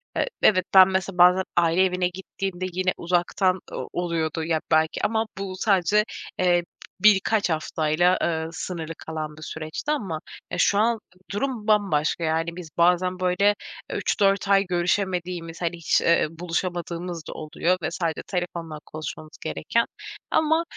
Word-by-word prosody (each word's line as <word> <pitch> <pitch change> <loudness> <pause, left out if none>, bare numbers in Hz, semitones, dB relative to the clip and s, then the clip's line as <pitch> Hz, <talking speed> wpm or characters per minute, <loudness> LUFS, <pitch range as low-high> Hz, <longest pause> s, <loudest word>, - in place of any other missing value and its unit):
eee, - - +1
evet 185 -3 +4
ben, 190 -1 +9
mesela, 190 0 -2
bazen 180 +1 +6
aile 170 +2 +4
evine 180 -1 +1
gittiğimde 185 0 -5
yine 185 +1 0
uzaktan 180 +2 +1
o - - -5
oluyordu 165 -2 -1
ya 160 -1 0
belki 160 0 +2
ama 220 +1 +1
bu 195 -1 -4
sadece, 200 +1 +3 0.4
eee, 175 -1 +3 0.4
b - - -19
birkaç 210 0 +4
haftayla, 160 +2 +1
ııı, 160 -1 -1
sınırlı 165 -2 -5
kalan 155 -1 -6
bir - - -12
süreçti 155 - -4
ama 195 - -2 0.3
ya, - - -3
şu 200 - +3
an 230 +1 +2 0.3
durum 220 +1 -2
bambaşka, 190 -7 +2
yani 165 +1 0
biz 175 -3 -8
bazen, 180 +2 +3
böyle, 185 +3 +3 0.4
3-4 195 0 +1
ay 200 0 +5
görüşemediğimiz, 175 -2 -1
hani, 175 0 -1
hiç, 170 - +2
eee, 170 -1 +3
buluşamadığımız 175 0 -3
da - - -5
oluyor 165 +4 -1
ve 160 - -2
sadece 165 -2 -2
telefonla 170 -4 -4
konuşmamız 155 +1 -8
gereken 230 0 0 0.5
ama, 320 +1 +3
180 Hz, 145 wpm, -24 LUFS, 165-190 Hz, 0.5 s, ben